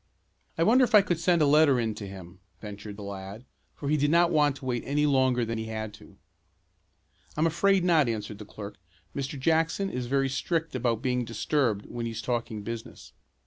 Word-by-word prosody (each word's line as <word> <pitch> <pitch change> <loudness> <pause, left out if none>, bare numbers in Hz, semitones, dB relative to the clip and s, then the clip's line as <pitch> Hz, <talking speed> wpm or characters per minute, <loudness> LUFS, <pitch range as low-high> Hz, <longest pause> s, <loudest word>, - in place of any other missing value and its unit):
"I 165 - +3
wonder 245 +7 +5
if 240 -3 +3
I 205 - +8
could 175 -4 -1
send 170 -1 +3
a - - +5
letter 145 -2 +5
in 115 -2 -1
to 105 -1 -7
him," 95 -2 -11 0.2
ventured 105 0 -8
the 105 - -8
lad, 100 +3 -8 0.3
for 140 - -6
he 150 +2 +2
did 145 0 +2
not 170 +2 +4
want 150 -3 +3
to 135 - -11
wait 120 -2 -1
any 145 +2 +1
longer 130 -4 +2
than 115 0 -3
he 110 - -4
had 110 -1 -5
to. 105 - -16 1.2
"I'm 155 - +2
afraid 190 +3 +2
not," 160 -7 +3
answered 105 -2 -4
the 105 - -8
clerk. 105 0 -9 0.4
"Mr. 140 0 -4
Jackson 165 +6 +1
is 125 -1 -4
very 135 +1 +1
strict 165 +4 -2
about 120 -3 -1
being 125 -1 0
disturbed 115 -1 -1
when 120 -1 -5
he's 115 -1 -5
talking 115 -4 -3
business." 115 +1 -8
130 Hz, 200 wpm, -27 LUFS, 110-155 Hz, 1.2 s, I